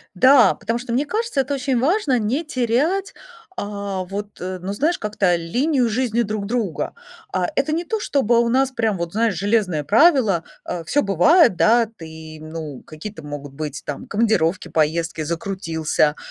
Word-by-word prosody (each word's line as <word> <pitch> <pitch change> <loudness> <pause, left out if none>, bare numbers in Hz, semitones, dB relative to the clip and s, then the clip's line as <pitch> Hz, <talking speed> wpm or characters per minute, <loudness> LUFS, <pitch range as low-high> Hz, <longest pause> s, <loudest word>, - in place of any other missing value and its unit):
Да, 255 +5 +6
потому 230 +3 -3
что 245 0 -7
мне 275 +4 +1
кажется, 430 -5 -1
это 270 +2 -3
очень 265 -2 0
важно 295 - +2
не 245 +9 -1
терять, 300 - 0 0.5
а, 200 -2 -4
вот, 205 +2 -7
э, 185 +1 -4
ну 190 +2 -4
знаешь, 305 +11 +1
как-то, 205 -4 +1
линию 245 - 0
жизни 235 0 0
друг 210 -2 -3
друга. 215 -7 -2 0.4
А, 180 - +1
это 275 +3 +1
не 335 +2 -1
то 440 +5 -2
чтобы 245 - +2
у 235 - +2
нас 265 +2 +2
прям 225 -5 0
вот, 170 -1 -4
знаешь, 225 +1 +1
железное 200 -6 +1
правило, 220 - +4 0.2
а, 175 -2 -5
всё 290 - +2
бывает, 200 - +4
да, 230 +4 +4
ты, 160 -6 -11
ну, 155 -3 -7
какие-то 160 +5 -8
могут 145 -2 -8
быть 145 -1 -6
там 145 - -6
командировки, 200 -5 +1
поездки, 160 +1 0
закрутился, 165 -3 -1
210 Hz, 165 wpm, -21 LUFS, 170-255 Hz, 0.5 s, Да